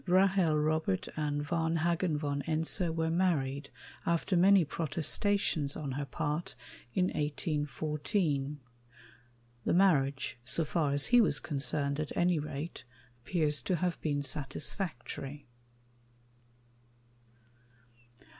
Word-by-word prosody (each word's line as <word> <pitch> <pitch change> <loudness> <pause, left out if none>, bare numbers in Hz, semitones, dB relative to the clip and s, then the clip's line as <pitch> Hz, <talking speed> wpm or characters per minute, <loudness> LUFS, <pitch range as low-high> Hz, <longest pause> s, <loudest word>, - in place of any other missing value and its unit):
Rahel 185 -3 +4
Robert 155 -10 0
and 145 -1 -1
Varnhagen 165 0 +1
von 145 -1 -2
Ense 165 +3 +1
were 160 0 0
married, 145 -6 0 0.3
after 170 +3 +1
many 185 0 +6
protestations 160 0 0
on 145 -3 -4
her 140 +2 -3
part, 150 +5 -3 0.4
in 185 -1 +3
1814. 150 0 -1 1.0
The - - +1
marriage 140 - +2
so 165 +6 0
far 150 -2 0
as 145 0 +3
he 245 - +9
was 175 -9 +2
concerned, 140 -1 -2
at 155 - -4
any 175 -2 +3
rate 150 +2 -5 0.4
appears 150 -5 +1
to 180 - 0
have 175 +1 -1
been 145 -2 0
satisfactory. 140 0 -4
155 Hz, 105 wpm, -32 LUFS, 145-170 Hz, 1.0 s, he